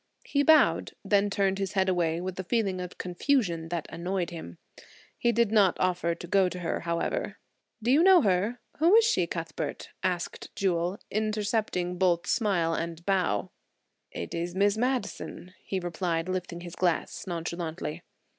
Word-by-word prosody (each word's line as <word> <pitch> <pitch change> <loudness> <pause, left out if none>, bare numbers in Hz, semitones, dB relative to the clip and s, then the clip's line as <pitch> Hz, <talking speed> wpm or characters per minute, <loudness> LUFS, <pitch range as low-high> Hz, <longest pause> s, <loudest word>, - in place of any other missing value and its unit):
He 285 - +1
bowed, 315 +2 +4
then 205 0 +3
turned 195 -1 +1
his 195 -1 -2
head 190 -1 +2
away 170 -3 +1
with 185 +1 -5
a - - -2
feeling 195 -3 0
of 180 -1 -7
confusion 180 - 0
that 170 -2 -2
annoyed 175 +1 -2
him. 85 - -8 0.6
He 235 - +2
did 230 -2 +2
not 205 -5 +4
offer 180 -2 +1
to 170 - -9
go 190 0 +3
to 180 0 -7
her, 170 - -1
however. 170 - -2 0.5
"Do 240 - +2
you 290 +4 +6
know 370 -1 +7
her? 200 +5 +1 0.2
Who 340 +6 +6
is 455 0 +7
she, 180 - +2
Cuthbert?" 165 -1 -5
asked 175 -2 -2
Jewel, 180 0 0
intercepting 210 -4 -1
both 180 -2 +2
smile 180 -7 +1
and 165 0 -4
bow. 185 - +1 0.6
"It 85 - -6
is 175 +1 -3
Miss 200 +1 +3
Madison," 220 -6 -3
he 190 - -2
replied, 170 -1 -2
lifting 180 -2 -3
his 175 -1 -8
glass 180 +1 -1
nonchalantly. 170 -1 -4
185 Hz, 160 wpm, -28 LUFS, 170-205 Hz, 0.6 s, know